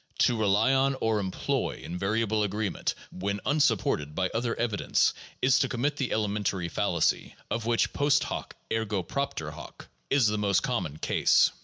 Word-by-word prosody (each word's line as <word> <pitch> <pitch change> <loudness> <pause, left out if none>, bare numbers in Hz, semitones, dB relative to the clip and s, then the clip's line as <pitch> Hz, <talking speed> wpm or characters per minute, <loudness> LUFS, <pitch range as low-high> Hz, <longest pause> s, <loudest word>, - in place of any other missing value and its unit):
To 120 - +3
rely 110 +3 +3
on 135 0 +3
or 110 -1 +1
employ 95 -2 -2
invariable 105 +4 0
agreement 105 -1 -1 0.2
when 100 +2 -3
unsupported 115 - +1
by 95 +1 0
other 115 0 -1
evidence 110 -4 +1 0.3
is 130 0 +5
to - - +1
commit 140 +4 0
that 135 -4 -1
elementary 100 -4 -1
fallacy, 85 -4 0 0.2
of 115 -1 -2
which 120 -1 +1
post 145 0 +3
hoc - - -5 0.2
ergo 105 -4 -1
propter 140 - -3
hoc 75 -2 -11 0.2
is 140 -4 +4
the 105 0 +1
most 100 -2 +2
common 75 0 -2
case. - - +3
105 Hz, 155 wpm, -28 LUFS, 95-120 Hz, 0.3 s, is